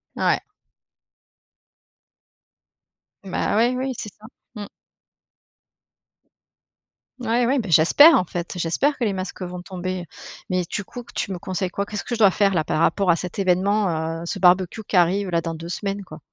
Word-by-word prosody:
Ouais. - - +1 2.8
Ben, 190 +1 -2
ouais, 240 +3 +3
oui, 260 +1 -2
c'est 210 - -6
ça, 215 - -18 0.3
mmh. 205 -1 -6 2.5
Ouais, 240 0 +1
oui, 275 - +2
ben, 210 -9 -3
j'espère 180 - +7
en 180 - +2
fait! 175 0 -5
J'espère 220 - 0
que - - -4
les 210 - +1
masques 185 -1 -6
vont 180 0 -6
tomber, 185 0 -5
heu. - - -9 0.5
Mais 185 0 +1
du 205 - -3
coup, 245 - -8
qu - - -16
tu 200 - -2
me 180 - -4
conseilles 185 0 -3
quoi? 200 - -2
Qu'est-ce 210 -2 -5
que 240 - -5
je 235 - -3
dois 205 -3 +7
faire 195 +1 +2
là 165 -3 +1
par 155 - -2
rapport 190 +3 +2
à 170 - +6
cet 180 +3 -6
évènement? 180 -4 +1
Heu, - - -6
ce 195 - -3
barbecue 185 +3 +3
qui 200 - -5
arrive 185 +2 +2
là 170 -1 +1
dans 165 0 -4
2 165 +1 -8
semaines 200 +3 -4
quoi. 155 -4 -12
190 Hz, 180 wpm, -22 LUFS, 175-210 Hz, 2.8 s, j'espère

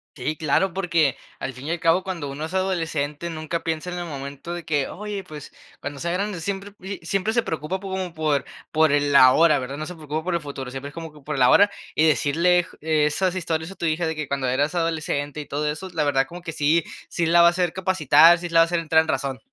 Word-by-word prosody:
Sí, 155 - -3
claro, 165 +4 +1
porque, 170 -7 +1 0.2
al 135 - -4
fin 130 +4 -9
y - - -1
al 170 - -2
cabo, 175 +2 +3
cuando 170 -7 -4
uno 145 +3 -6
es 170 - -8
adolescente, 170 -4 -1
nunca 160 +1 -4
piensa 165 +2 -3
en 180 - -4
el 175 - -4
momento 140 +2 -7
de 175 -2 -6
que: 145 -3 0
"Oye, 205 0 -5
pues, 150 -5 -10 0.3
cuando 145 0 -6
sea 170 +3 -2
grande". 190 0 -2
Siempre 200 +3 -4
pri 195 0 -7
siempre 195 +5 0
se 235 0 +1
preocupa 160 +4 -3
como 190 -3 -4
por 155 -3 0 0.3
por 155 -1 +3
el 145 -1 +2
ahora, 140 +3 +6
¿verdad? 135 +2 -5
No 155 - -4
se 180 +2 -7
preocupa 155 0 -4
por 185 - -2
el 170 - 0
futuro, 135 -3 -7
siempre 135 +1 -6
es 145 - -16
como 165 -2 -7
que 150 - -16
por 150 +2 -4
el 135 - -1
ahora. 130 +11 +6 0.3
Y 160 +1 +4
decirle 170 +4 +3 0.2
esas 155 +4 +1
historias 165 -1 -2
a - - -10
tu 170 - -4
hija 160 +1 0
de 160 - -2
que 155 -2 -4
cuando 140 -2 -1
eras 145 +6 +1
adolescente 155 -3 -2
y 145 - -8
todo 150 +1 -1
eso, 185 +5 -7
la 160 - +1
verdad 135 -2 +2
como 175 +1 -9
que 170 -1 -6
sí 155 +3 +2 0.2
sí 170 - -1
la 170 +1 +6
va 170 - +8
a 170 - +6
hacer 175 -1 0
capacitar, 175 -2 +5
sí 175 0 -5
la 165 0 +4
va - - +9
a - - +2
hacer 170 0 -1
entrar 160 0 +3
en 160 - -11
razón. 135 -3 -2
160 Hz, 250 wpm, -23 LUFS, 145-175 Hz, 0.3 s, va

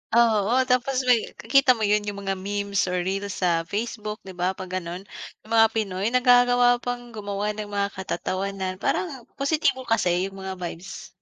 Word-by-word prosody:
Ye - - +7
oo, 220 0 +3 0.2
tapos 255 +1 +2
may 245 -2 +6 0.2
ki - - -10
kita 275 -2 +7
mo 220 - -2
'yon 210 0 +3
'yong 200 -1 -4
mga 195 -1 -1
memes 200 -1 0
or 180 - 0
reels 195 +1 -2
sa 180 - +3 0.2
Facebook, 215 -1 -3
'di 190 - -10
ba, 180 - +2
'pag 185 -1 -7
gano'n. 175 0 -4 0.4
'Yong 220 - -18
mga 225 0 +7
Pinoy 200 -2 -1
nagagawa 245 -1 +5 0.2
pang 245 0 -3
gumawa 205 -1 -3
ng 210 -1 -6
mga 200 0 +1
katatawanan, 190 0 -3
parang 370 - +1 0.3
positibo 280 -2 +1
kasi 185 -4 +2
'yong 195 - -11
mga 190 - -4
vibes. 175 +1 -7
205 Hz, 180 wpm, -25 LUFS, 190-240 Hz, 0.4 s, Ye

